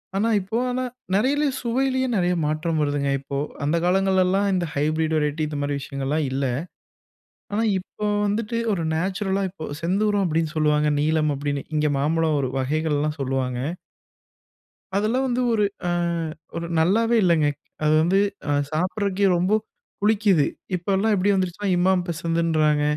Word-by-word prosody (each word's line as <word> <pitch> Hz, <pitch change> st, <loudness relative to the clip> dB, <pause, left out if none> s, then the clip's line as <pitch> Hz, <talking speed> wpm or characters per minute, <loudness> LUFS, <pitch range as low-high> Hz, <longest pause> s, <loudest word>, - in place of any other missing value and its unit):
ஆனா, 210 Hz, +4 st, +1 dB
இப்போ 195 Hz, +4 st, -3 dB
ஆனா, 255 Hz, +1 st, -1 dB, 0.3 s
நெறைய 275 Hz, +9 st, +2 dB
சுவையிலே 260 Hz, +2 st, 0 dB
நெறைய 180 Hz, -2 st, +2 dB
மாற்றம் 155 Hz, +2 st, -1 dB
வருதுங்க. 145 Hz, -1 st, 0 dB
இப்போ 140 Hz, +1 st, -5 dB, 0.3 s
அந்த 150 Hz, +4 st, +1 dB
காலங்கள்லெல்லா 190 Hz, +1 st, +3 dB
இந்த 180 Hz, -2 st, 0 dB
ஹைப்ரிட் 155 Hz, +2 st, 0 dB
வெரைட்டி 150 Hz, +1 st, 0 dB
இந்த 150 Hz, -1 st, -5 dB
மாரி 145 Hz, 0 st, -1 dB
விஷயங்கலெல்லா 140 Hz, +2 st, -2 dB
இல்ல. 135 Hz, +1 st, -1 dB, 1.1 s
ஆனா, 215 Hz, +2 st, +1 dB, 0.2 s
இப்போ 210 Hz, +3 st, -6 dB, 0.2 s
வந்துட்டு 215 Hz, +3 st, -1 dB
ஒரு 180 Hz, -4 st, -1 dB
நேச்சுரல்லா 190 Hz, +3 st, -1 dB
இப்போ 175 Hz, -4 st, -9 dB, 0.2 s
செந்தூரம் 200 Hz, +3 st, +1 dB
அப்படீன்னு 160 Hz, -1 st, -1 dB
சொல்வாங்க, 150 Hz, -1 st, +2 dB
நீலம் 155 Hz, 0 st, +2 dB
அப்படீன்னு. 145 Hz, 0 st, -3 dB
இங்க 150 Hz, 0 st, +2 dB
மாம்பழம் 155 Hz, +1 st, +1 dB
ஒரு 130 Hz, -, -1 dB
வகைகலெல்லா 150 Hz, +2 st, 0 dB
சொல்லுவாங்க. 130 Hz, -2 st, -1 dB, 1.4 s
அதெல்லாம் 225 Hz, +6 st, +1 dB
வந்து 250 Hz, 0 st, 0 dB
ஒரு 215 Hz, -2 st, +2 dB, 0.2 s
ஆ -, -, +1 dB, 0.7 s
ஒரு 170 Hz, 0 st, -3 dB
நல்லாவே 225 Hz, +8 st, +3 dB
இல்லைங்க. 165 Hz, -4 st, +3 dB, 0.4 s
அது 155 Hz, -, +3 dB
வந்து 180 Hz, +4 st, +3 dB, 0.5 s
சாப்பிட்றதுக்கே 195 Hz, +4 st, 0 dB
ரொம்ப 180 Hz, +4 st, +1 dB, 0.5 s
புளிக்குது. 205 Hz, -7 st, +3 dB, 0.3 s
இப்போலா 195 Hz, +4 st, +1 dB
எப்படி 200 Hz, +1 st, +2 dB
வந்துருச்சுன்னா, 190 Hz, +2 st, -1 dB
இமாம் 180 Hz, 0 st, +2 dB
பசந்துன்றாங்க, 160 Hz, -2 st, +1 dB
170 Hz, 135 wpm, -23 LUFS, 150-200 Hz, 1.4 s, காலங்கள்லெல்லா